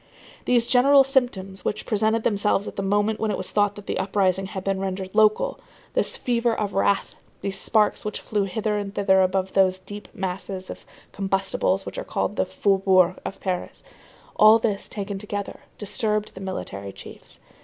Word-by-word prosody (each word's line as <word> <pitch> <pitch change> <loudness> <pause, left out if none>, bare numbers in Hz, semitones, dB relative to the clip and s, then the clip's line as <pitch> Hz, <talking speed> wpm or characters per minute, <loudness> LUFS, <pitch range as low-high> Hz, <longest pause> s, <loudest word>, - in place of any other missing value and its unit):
These 240 -1 +3
general 275 +2 +6
symptoms 245 -8 -1
which 210 - -3
presented 220 +1 +1
themselves 205 -1 +1
at - - -7
the - - -2
moment 205 +2 +1
when 220 - 0
it - - -1
was - - -1
thought 205 -1 +2
that 205 - -11
the - - -2
uprising 190 -1 +1
had 190 -1 -6
been 195 0 -1
rendered 190 -1 -4
local, 215 - +3 0.3
this - - +1
fever 235 -1 0
of 205 -2 -2
wrath, 195 0 +1 0.3
these 195 -1 -3
sparks 215 -2 +2
which 210 - -4
flew 205 -2 -1
hither 210 +2 -1
and 200 -1 -6
thither 190 -1 +4
above 190 0 0
those 190 -1 +3
deep 205 +3 -10
masses 185 0 -4
of - - -11 0.2
combustibles 195 0 0
which - - -6
are - - -4
called - - -2
the - - 0
faubourgs 190 -2 +3
of 195 - -6
Paris,—all 210 +3 +1
this, 215 -3 -2
taken 200 -1 -4
together, 205 -1 -5 0.2
disturbed 210 0 -1
the 190 - -10
military 100 - -5
chiefs. - - -12
200 Hz, 175 wpm, -24 LUFS, 190-215 Hz, 0.3 s, general